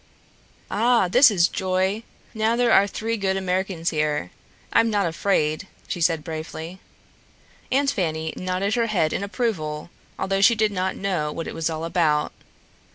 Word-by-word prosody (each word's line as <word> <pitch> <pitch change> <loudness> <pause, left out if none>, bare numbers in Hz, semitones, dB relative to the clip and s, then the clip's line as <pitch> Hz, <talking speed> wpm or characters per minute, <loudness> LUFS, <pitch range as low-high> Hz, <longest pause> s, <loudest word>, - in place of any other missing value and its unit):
"Ah, 230 -2 +3
this 260 +9 +7
is 180 -5 +3
joy! 190 +3 -1 0.3
Now 220 +1 +1
there 240 -1 +2
are 200 -1 +6
three 225 +3 -3
good 190 -2 0
Americans 185 -2 -1
here. 150 - -1 0.4
I'm 230 - +4
not 205 -3 +1
afraid," 165 -1 0 0.2
she 175 - -4
said 165 -2 +2
bravely. 160 +2 -6 0.9
Aunt 275 +1 +2
Fanny 160 -3 -2
nodded 185 +3 -1
her 235 -1 +1
head 175 -8 +1
in - - -2
approval, 175 -9 -3 0.3
although 195 0 0
she 230 +4 +6
did 215 -1 +2
not 185 -1 -1
know 180 -6 -1
what 165 +1 -5
it - - -5
was 165 0 -1
all 160 0 -4
about. 165 -3 +1
185 Hz, 160 wpm, -23 LUFS, 160-210 Hz, 0.9 s, this